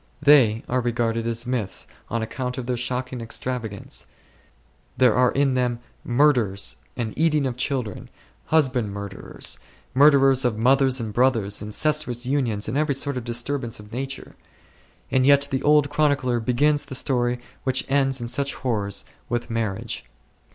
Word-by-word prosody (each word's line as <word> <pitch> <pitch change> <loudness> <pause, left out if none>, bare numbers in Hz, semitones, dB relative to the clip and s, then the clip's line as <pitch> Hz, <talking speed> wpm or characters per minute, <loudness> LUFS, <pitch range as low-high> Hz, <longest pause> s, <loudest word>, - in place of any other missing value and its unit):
They 135 -7 +5
are 125 +1 0
regarded 115 -1 -1
as 115 +1 -1
myths 120 -6 -2 0.2
on 115 0 -1
account 125 +2 -4
of 130 - -4
their 125 0 -1
shocking 125 +1 -3
extravagance; 115 -2 -4 0.9
there 125 -3 +5
are 125 +2 +4
in 140 -1 +2
them 125 -2 0 0.3
murders 120 - +2 0.2
and 115 -3 -3
eating 155 -3 +2
of 130 -2 -2
children, 125 -5 -3 0.4
husband 130 -9 +1
murders, 100 -1 -3 0.3
murders 135 -1 +5
of 120 -3 0
mothers 130 +2 +3
and 110 -2 -4
brothers, 115 -5 +2
incestuous 125 +2 0
unions, 125 -6 0
and 125 +7 -1
every 150 -2 +1
sort 140 +1 -1
of 125 - -4
disturbance 120 0 -3
of 105 +1 -13
nature; 135 +2 -5 0.8
and 130 - +3
yet 140 0 +5
the 130 0 0
old 150 -1 +3
chronicler 145 -5 +1
begins 145 +6 +1
the 130 - -5
story 125 -2 +1 0.2
which 130 -1 +1
ends 135 -1 +1
in 120 - -4
such 140 +4 0
horrors 105 -6 -2 0.2
with 120 0 -2
marriage. 110 -4 -3
125 Hz, 150 wpm, -23 LUFS, 115-135 Hz, 0.9 s, They